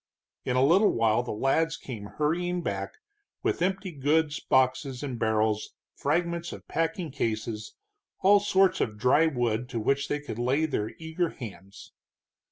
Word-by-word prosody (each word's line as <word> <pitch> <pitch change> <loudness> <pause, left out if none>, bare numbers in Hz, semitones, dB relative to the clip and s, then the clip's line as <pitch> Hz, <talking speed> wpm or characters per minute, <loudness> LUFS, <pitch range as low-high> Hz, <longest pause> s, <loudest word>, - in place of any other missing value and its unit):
In 125 - 0
a 130 +1 +4
little 190 +8 +5
while 115 0 +2
the 125 - -5
lads 150 +9 +1
came 110 -6 -7
hurrying 175 +8 -1
back, 100 -4 -3 0.5
with - - 0
empty 190 +1 -1
goods 150 +1 +1
boxes 130 +1 +1
and 130 -5 -4
barrels, 110 -1 0 0.2
fragments 170 0 -1
of - - -10
packing 165 0 -2
cases, 110 -4 -3 0.5
all 200 +2 +6
sorts 190 -2 +3
of 105 -2 -1
dry 130 +8 +4
wood 120 -4 -1
to 120 -3 -3
which 140 +6 +1
they 145 - -1
could 145 -6 -7
lay 135 +6 +2
their 110 -8 -2
eager 160 +1 -2
hands. 100 - -10
135 Hz, 155 wpm, -28 LUFS, 115-165 Hz, 0.5 s, all